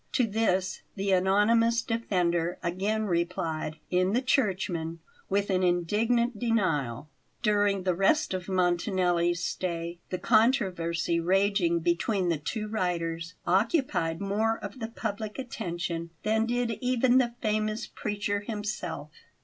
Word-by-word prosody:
To 250 Hz, -, +3 dB
this 195 Hz, -4 st, 0 dB
the 195 Hz, -1 st, -1 dB
anonymous 215 Hz, +5 st, +3 dB
defender 180 Hz, -7 st, 0 dB
again 200 Hz, +5 st, 0 dB
replied 170 Hz, -4 st, -1 dB
in 185 Hz, +2 st, +2 dB
the 245 Hz, -, +2 dB
Churchman 185 Hz, -, 0 dB, 0.3 s
with 200 Hz, +1 st, +1 dB
an 185 Hz, -1 st, +2 dB
indignant 210 Hz, +7 st, +1 dB
denial. 150 Hz, -, 0 dB, 0.3 s
During 205 Hz, -3 st, +2 dB
the 185 Hz, -1 st, +2 dB
rest 195 Hz, -, +2 dB
of 185 Hz, 0 st, -4 dB
Montanelli's 175 Hz, -1 st, +1 dB
stay 170 Hz, -1 st, -3 dB
the 185 Hz, -, -2 dB
controversy 185 Hz, -7 st, +2 dB
raging 185 Hz, -1 st, +2 dB
between 175 Hz, +3 st, +1 dB
the 165 Hz, -3 st, 0 dB
two 215 Hz, +8 st, -3 dB
writers 170 Hz, -5 st, -2 dB
occupied 190 Hz, -, +1 dB
more 215 Hz, +3 st, 0 dB
of 205 Hz, +5 st, -8 dB
the 225 Hz, -, -3 dB
public 215 Hz, -2 st, -4 dB
attention 175 Hz, -9 st, -4 dB
than 220 Hz, +1 st, +2 dB
did 240 Hz, -2 st, -1 dB
even 250 Hz, 0 st, +3 dB
the 240 Hz, -2 st, 0 dB
famous 215 Hz, +1 st, -1 dB
preacher 205 Hz, -1 st, -2 dB
himself. 205 Hz, -7 st, -5 dB
195 Hz, 125 wpm, -28 LUFS, 175-220 Hz, 0.3 s, To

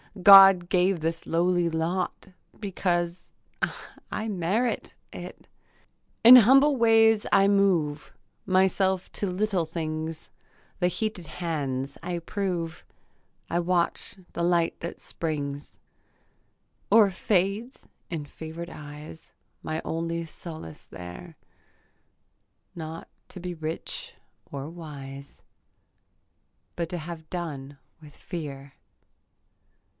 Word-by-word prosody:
God 195 Hz, -2 st, +10 dB
gave 185 Hz, 0 st, +2 dB
this 165 Hz, +1 st, -3 dB
lowly 175 Hz, +1 st, +2 dB
lot 170 Hz, +3 st, -2 dB, 0.3 s
Because 175 Hz, -3 st, -2 dB, 0.8 s
I 220 Hz, -, -3 dB
merit 210 Hz, +5 st, -1 dB, 0.2 s
it. -, -, -9 dB, 0.8 s
In 245 Hz, +3 st, +12 dB
humble 270 Hz, +5 st, +6 dB
ways 225 Hz, -2 st, +5 dB
I 195 Hz, 0 st, +5 dB
move 180 Hz, -7 st, +2 dB, 0.4 s
Myself 190 Hz, 0 st, +2 dB
to 205 Hz, -, -2 dB
little 195 Hz, -1 st, 0 dB
things; 160 Hz, -1 st, -4 dB, 0.5 s
The 180 Hz, -, +3 dB
heated 180 Hz, -1 st, -3 dB
hands 145 Hz, -5 st, -3 dB
I 175 Hz, 0 st, -2 dB
prove, 170 Hz, -3 st, -3 dB, 0.7 s
I 170 Hz, -, +1 dB
watch 175 Hz, +2 st, 0 dB, 0.2 s
the 170 Hz, -, -2 dB
light 170 Hz, -1 st, +2 dB
that 170 Hz, -, -6 dB
springs 145 Hz, -3 st, -5 dB, 1.1 s
Or 210 Hz, -1 st, +6 dB
fades 200 Hz, +6 st, -1 dB, 0.2 s
in 160 Hz, -4 st, -4 dB
fever'd 160 Hz, +3 st, -8 dB
eyes; 150 Hz, +1 st, -10 dB, 0.3 s
My 155 Hz, +1 st, -3 dB
only 165 Hz, +1 st, -2 dB
solace 155 Hz, -, -10 dB
here, 90 Hz, -, -9 dB, 1.4 s
Not 160 Hz, 0 st, -7 dB, 0.2 s
to 185 Hz, -, -9 dB
be 180 Hz, 0 st, -5 dB
rich 160 Hz, 0 st, -6 dB, 0.4 s
or 140 Hz, 0 st, -5 dB
wise 140 Hz, -4 st, -10 dB, 1.3 s
But 170 Hz, -1 st, -3 dB
to 180 Hz, -, -3 dB
have 160 Hz, -1 st, -8 dB
done 145 Hz, -6 st, -5 dB, 0.2 s
with 150 Hz, -2 st, -14 dB
fear. 140 Hz, -5 st, -7 dB
170 Hz, 100 wpm, -27 LUFS, 155-190 Hz, 1.4 s, In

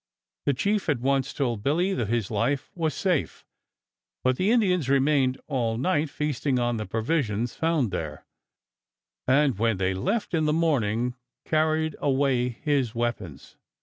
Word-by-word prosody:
The 140 Hz, -, +3 dB
chief 200 Hz, +5 st, 0 dB
at 140 Hz, -5 st, +1 dB
once 135 Hz, +1 st, +1 dB
told 120 Hz, -7 st, -2 dB
Billy 170 Hz, -, +1 dB
that 120 Hz, -, -1 dB
his 115 Hz, -2 st, -1 dB
life 120 Hz, +6 st, -1 dB
was 165 Hz, -5 st, -1 dB
safe; 180 Hz, -6 st, -1 dB, 0.8 s
but 130 Hz, 0 st, +3 dB
the 185 Hz, +9 st, +1 dB
Indians 185 Hz, -, +2 dB
remained 135 Hz, -1 st, +2 dB
all 120 Hz, -6 st, -1 dB
night, 150 Hz, +2 st, +1 dB
feasting 145 Hz, -2 st, -1 dB
on 120 Hz, -1 st, 0 dB
the 110 Hz, -, -4 dB
provisions 115 Hz, -2 st, -1 dB
found 160 Hz, -, 0 dB
there, 75 Hz, -3 st, -5 dB, 1.0 s
and 135 Hz, -4 st, +3 dB
when 115 Hz, -3 st, +2 dB
they 95 Hz, 0 st, 0 dB
left 200 Hz, -, -2 dB
in 160 Hz, -2 st, +2 dB
the 150 Hz, -, +2 dB
morning 125 Hz, -7 st, +1 dB, 0.3 s
carried 155 Hz, 0 st, +1 dB
away 135 Hz, -3 st, +1 dB
his 130 Hz, -1 st, -1 dB
weapons. 115 Hz, -, -4 dB
135 Hz, 150 wpm, -26 LUFS, 115-155 Hz, 1.0 s, The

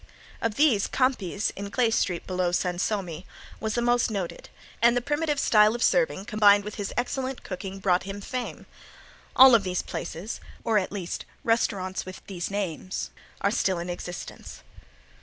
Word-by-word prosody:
Of 230 Hz, -2 st, -1 dB
these 265 Hz, -9 st, +4 dB
Campi's, 225 Hz, -7 st, 0 dB
in 200 Hz, +1 st, -5 dB
Clay 235 Hz, +1 st, +2 dB
street 180 Hz, -5 st, 0 dB
below 185 Hz, -1 st, 0 dB
Sansome, 180 Hz, -1 st, -1 dB, 0.4 s
was 220 Hz, -1 st, -2 dB
the 240 Hz, -, +1 dB
most 240 Hz, 0 st, +3 dB
noted, 195 Hz, -5 st, -4 dB, 0.3 s
and 235 Hz, +1 st, +5 dB
the -, -, +4 dB
primitive 295 Hz, +3 st, -1 dB
style 215 Hz, -2 st, +5 dB
of 240 Hz, -, -1 dB
serving -, -, +2 dB
combined 205 Hz, -1 st, +5 dB
with 210 Hz, +1 st, -6 dB
his 205 Hz, -2 st, -4 dB
excellent 260 Hz, +1 st, -2 dB
cooking 190 Hz, 0 st, -6 dB
brought 185 Hz, -2 st, +2 dB
him 195 Hz, +1 st, -6 dB
fame. 250 Hz, +4 st, -5 dB, 0.7 s
All 260 Hz, 0 st, +9 dB
of 230 Hz, -, +7 dB
these 185 Hz, -1 st, -1 dB
places, 185 Hz, +7 st, -5 dB, 0.2 s
or 220 Hz, -2 st, +3 dB
at 185 Hz, -, -4 dB
least 190 Hz, -4 st, -4 dB, 0.2 s
restaurants 195 Hz, -5 st, 0 dB
with 185 Hz, 0 st, -10 dB
these 180 Hz, -3 st, -4 dB
names, 190 Hz, -2 st, -3 dB, 0.3 s
are 200 Hz, -, +2 dB
still 190 Hz, -4 st, +1 dB
in 175 Hz, +1 st, -4 dB
existence. 175 Hz, -, -8 dB
205 Hz, 160 wpm, -26 LUFS, 185-235 Hz, 0.7 s, All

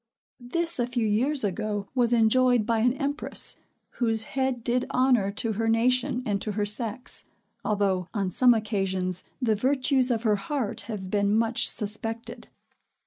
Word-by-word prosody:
This 335 Hz, 0 st, 0 dB
a 240 Hz, -, +1 dB
few 245 Hz, -2 st, -1 dB
years 255 Hz, +7 st, +1 dB
ago, 205 Hz, 0 st, -2 dB
was 245 Hz, -2 st, +2 dB
enjoyed 240 Hz, 0 st, +4 dB
by 230 Hz, 0 st, +1 dB
an 245 Hz, +2 st, +3 dB
empress, 285 Hz, +1 st, -1 dB, 0.4 s
whose 225 Hz, -2 st, +1 dB
head 260 Hz, 0 st, -2 dB
did 245 Hz, +1 st, 0 dB
honor 250 Hz, -6 st, +3 dB
to 225 Hz, +1 st, -1 dB
her 225 Hz, +2 st, -1 dB
nation 250 Hz, +3 st, +1 dB
and 200 Hz, -2 st, -1 dB
to 210 Hz, -, -3 dB
her 210 Hz, 0 st, 0 dB
sex; 230 Hz, +4 st, -4 dB, 0.4 s
although, 195 Hz, -4 st, 0 dB
on 195 Hz, -4 st, -2 dB
some 245 Hz, +4 st, +5 dB
occasions, 190 Hz, -4 st, -2 dB
the 240 Hz, -4 st, +2 dB
virtues 260 Hz, +3 st, +2 dB
of 230 Hz, -2 st, 0 dB
her 210 Hz, -3 st, +3 dB
heart 225 Hz, 0 st, -3 dB
have 190 Hz, -4 st, -5 dB
been 205 Hz, 0 st, +2 dB
much 230 Hz, +1 st, +2 dB
suspected. 225 Hz, +2 st, -5 dB
225 Hz, 155 wpm, -26 LUFS, 210-250 Hz, 0.4 s, some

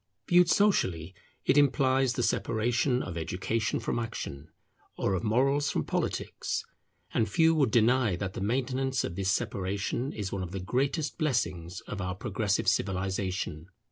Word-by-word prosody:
Viewed 175 Hz, 0 st, +5 dB
socially, 95 Hz, -, +2 dB, 0.3 s
it 145 Hz, -, +5 dB
implies 135 Hz, -2 st, +3 dB
the 120 Hz, -, -1 dB
separation 120 Hz, +4 st, +1 dB
of 85 Hz, -2 st, -5 dB
education 105 Hz, +7 st, -1 dB
from -, -, -2 dB
action; 80 Hz, -10 st, -5 dB, 0.5 s
or -, -, 0 dB
of 95 Hz, -, -1 dB
morals 135 Hz, +6 st, +2 dB
from -, -, 0 dB
politics; -, -, -2 dB, 0.5 s
and 110 Hz, -2 st, +1 dB
few 160 Hz, +9 st, +4 dB
would 145 Hz, -6 st, +3 dB
deny 115 Hz, -2 st, +3 dB
that 95 Hz, +1 st, -4 dB
the -, -, -5 dB
maintenance 130 Hz, +4 st, 0 dB
of 85 Hz, -, -4 dB
this 95 Hz, 0 st, -1 dB
separation 100 Hz, +7 st, -2 dB
is 100 Hz, -3 st, -4 dB
one 100 Hz, -, -3 dB
of 90 Hz, 0 st, -5 dB
the 95 Hz, -, -3 dB
greatest 135 Hz, -, -1 dB
blessings 90 Hz, -, -1 dB
of 105 Hz, -, -6 dB
our 90 Hz, 0 st, -3 dB
progressive 105 Hz, -1 st, -1 dB
civilization. 95 Hz, -3 st, -1 dB
110 Hz, 150 wpm, -29 LUFS, 95-130 Hz, 0.5 s, Viewed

